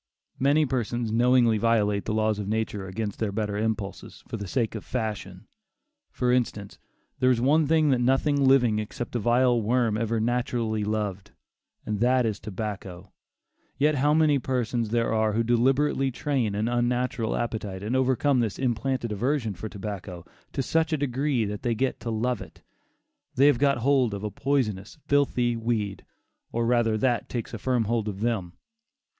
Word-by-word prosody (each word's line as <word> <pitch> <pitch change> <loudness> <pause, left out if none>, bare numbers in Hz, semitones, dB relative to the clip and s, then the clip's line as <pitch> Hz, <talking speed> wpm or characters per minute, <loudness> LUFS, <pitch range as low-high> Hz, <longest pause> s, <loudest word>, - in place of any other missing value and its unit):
Many 145 +3 +3
persons 120 -3 -2
knowingly 120 -1 +4
violate 105 -3 +1
the 110 - -2
laws 110 -1 +1
of 100 - -4
nature 105 -2 -2
against 100 +1 -4
their 110 -3 -1
better 105 0 -2
impulses, 105 -2 -4
for - - -5
the 100 - -5
sake 115 +3 -1
of 110 -4 -6
fashion. 105 -1 -4 0.7
For 125 -1 0
instance, 115 -5 -1 0.4
there 130 0 +4
is 125 -2 +3
one 145 +5 +3
thing 155 -1 +3
that 125 -2 +2
nothing 135 +3 +2
living 125 -5 +4
except 115 +3 -5
a - - +1
vile 120 +2 +3
worm 115 -1 +1
ever 115 0 0
naturally 115 -2 -1
loved, 105 -2 -3 0.5
and 105 -1 -2
that 125 +1 +3
is 110 -3 -2
tobacco; 100 -3 -6 0.7
yet 150 +2 +3
how 145 +1 +2
many 155 -3 +4
persons 120 -3 -1
there 115 0 +1
are 110 -1 +1
who 115 +2 +1
deliberately 135 +4 +2
train 125 -5 -1
an 105 +2 0
unnatural 120 0 0
appetite, 105 -5 -3
and 110 +5 -1
overcome 130 +1 +2
this 110 -5 -1
implanted 125 -1 -1
aversion 115 +1 -1
for 105 +4 -7
tobacco, 95 -4 -7 0.3
to 135 - -2
such 160 +4 +1
a 155 - +1
degree 135 -3 0
that 105 0 -5
they 120 -2 0
get 130 +4 -1
to 115 - -5
love 120 +3 -1
it. - - -12 0.7
They 135 - +5
have 145 -4 +4
got 140 -1 +3
hold 125 -3 +2
of 100 - -7
a 105 - -3
poisonous, 110 -6 -1
filthy 125 -4 +2
weed, 110 -4 -2 0.5
or 115 0 -1
rather 115 -2 +2
that 120 +1 0
takes 120 -3 -4
a - - -5
firm 125 -3 +1
hold 110 0 -1
of 100 -1 -5
them. 110 -7 -1
115 Hz, 175 wpm, -26 LUFS, 105-130 Hz, 0.7 s, They